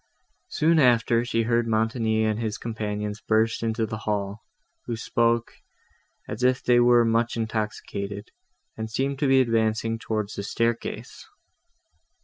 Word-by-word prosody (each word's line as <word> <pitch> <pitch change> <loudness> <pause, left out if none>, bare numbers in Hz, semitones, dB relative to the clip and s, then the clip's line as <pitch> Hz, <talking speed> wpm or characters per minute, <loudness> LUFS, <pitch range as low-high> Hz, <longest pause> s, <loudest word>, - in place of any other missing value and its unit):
Soon 160 +1 +2
after, 120 -3 +3
she 115 -1 0
heard 115 +1 +1
Montoni 110 0 +1
and 110 0 0
his 110 -2 -2
companions 105 -2 -4
burst 110 +1 +1
into 115 0 0
the 110 0 -5
hall, 105 0 -3 0.5
who 120 - -2
spoke, 115 +1 0 0.7
as 110 - -6
if 125 0 +2
they 120 -1 +4
were 120 -1 +5
much 115 +1 +1
intoxicated, 105 -2 -4 0.4
and 110 0 -5
seemed 135 +4 -2
to 145 - +1
be 135 0 +5
advancing 115 -1 0
towards 105 -2 -3
the - - -4
staircase. 115 - -3
115 Hz, 135 wpm, -25 LUFS, 110-120 Hz, 0.7 s, were